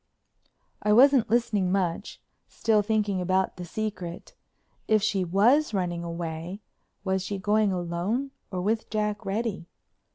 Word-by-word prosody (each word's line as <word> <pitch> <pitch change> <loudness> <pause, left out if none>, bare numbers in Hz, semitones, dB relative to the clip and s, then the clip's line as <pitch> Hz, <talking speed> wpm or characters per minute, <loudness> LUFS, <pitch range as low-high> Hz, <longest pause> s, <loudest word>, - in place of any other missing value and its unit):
I 210 - +3
wasn't 260 0 +6
listening 210 -5 +1
much, 185 -4 -1 0.3
still 220 -2 +2
thinking 205 -2 0
about 185 +1 0
"the 180 - -6
secret." 185 -3 -5 0.5
If 215 -2 +3
she 195 -3 +1
was 220 - +3
running 175 -2 -1
away 170 +3 -5 0.4
was 190 -1 0
she 195 +2 -4
going 210 +1 +2
alone 185 +9 -2 0.2
or 185 -3 -3
with 220 +3 -1
Jack 210 0 -1
Reddy? 200 -3 -2
200 Hz, 130 wpm, -27 LUFS, 180-215 Hz, 0.5 s, wasn't